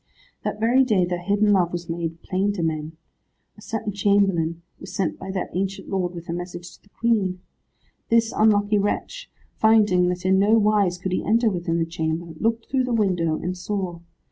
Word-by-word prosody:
That 210 - -3
very 240 +4 +4
day 210 -8 +2
their 175 0 -3
hidden 205 +2 +2
love 180 -3 +2
was 175 -1 -5
made 165 0 -4
plain 195 +2 0
to 180 -4 -3
men. 155 0 -3 0.6
A 210 - -16
certain 215 -1 -4
chamberlain 195 -5 +1 0.2
was 185 - -9
sent 190 -4 -1
by 190 - -7
that 190 -1 -3
ancient 195 +1 -3
lord 180 -2 -2
with 170 0 -8
a 170 - -3
message 175 0 -6
to - - -42
the 200 - -26
Queen. 200 -5 0 0.7
This 230 0 +3
unlucky 210 -1 +3
wretch, - - -3 0.3
finding 210 -5 +4
that 180 0 -3
in 190 0 +4
no 210 +3 +4
wise 205 -4 +2
could 185 +1 -4
he 185 - -1
enter 225 +1 +2
within 170 -2 -1
the 165 - +1
chamber, 165 0 -3
looked 225 0 0
through 260 -1 +1
the 250 - -3
window, 180 -7 +1
and 180 +3 -3
saw. 185 -2 -4
190 Hz, 195 wpm, -23 LUFS, 175-210 Hz, 0.7 s, very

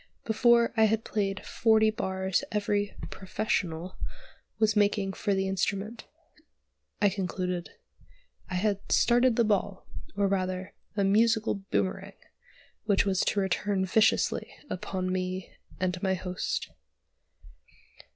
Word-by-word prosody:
Before 235 +1 +4
I 220 -1 +5
had 220 +1 +1
played 195 -2 -2
forty 220 -1 +3
bars 190 -2 -1
every 205 -1 0 0.2
"professional" 185 -3 -2 0.6
was 220 -1 +2
making 205 -1 +2
for 200 +1 0
the 190 0 0
instrument. 195 +3 -2 0.9
I 205 - +4
concluded. 180 -2 -2 0.8
I 180 - -3
had 200 +1 +1
"started 245 0 +4
the 235 - +4
ball," 205 -2 0 0.3
or 200 -1 +3
rather 185 -1 -2 0.2
a 200 - +3
musical 220 +2 +3 0.2
"boomerang," 195 +1 -1 0.7
which 200 -2 +3
was 190 -2 +1
to 205 - +1
return 190 +1 0
viciously 215 +3 +2 0.2
upon 185 0 -3
me 185 0 -3 0.3
and 180 -1 -1
my 190 -1 +1
host. 180 0 -3
195 Hz, 115 wpm, -28 LUFS, 185-215 Hz, 0.9 s, I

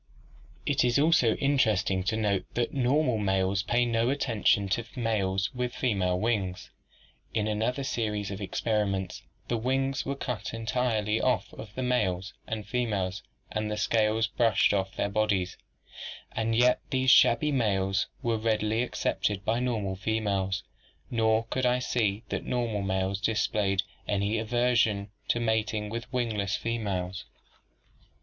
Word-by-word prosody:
"'It 145 - +2
is 120 0 +3
also 140 -7 +4
interesting 110 -9 +2
to 95 +4 -1
note 100 -4 +1
that 120 -1 0
normal 130 -2 +2
males 95 -1 +1
pay 120 +3 +1
no 115 0 +1
attention 115 -7 +2
to 115 +5 0
males 100 -3 0
with 125 -1 -3
female 95 -7 +1
wings. 100 -5 -1 0.6
"'In 110 -1 +1
another 115 +5 -1
series 105 -6 -2
of 100 +1 -6
experiments 100 -2 -1 0.3
the 120 - 0
wings 135 +3 0
were 140 - -3
cut 120 -6 -4
entirely 110 -1 0
off 125 -2 0
of 105 +1 -10
males 100 -7 0
and 110 -2 -4
females 100 -5 -1 0.3
and 105 0 -2
the 105 - -2
scales 110 +1 +2
brushed 110 -2 +2
off 95 -1 -1
their - - 0
bodies; 100 -3 0 0.8
and 115 0 -1
yet 125 +2 +4
these 130 -2 +3
shabby 125 +6 +5
males 95 -7 +1 0.2
were 115 -2 +1
readily 110 0 +1
accepted 105 -5 -1
by 115 +2 +1
normal 110 -6 -1
females 100 -2 -1 0.5
nor 110 -1 +2
could 130 -1 +1
I 125 0 +3
see 110 -4 0
that - - -2
normal 115 -4 -1
males 95 0 -1
displayed 105 -3 +1 0.2
any 100 +2 0
aversion 110 -3 +1 0.2
to 120 - +1
mating 110 -2 0
with 115 +2 -5
wingless 110 -5 -1
fe 115 0 -2
males. 95 -3 -3
110 Hz, 140 wpm, -28 LUFS, 100-120 Hz, 0.8 s, shabby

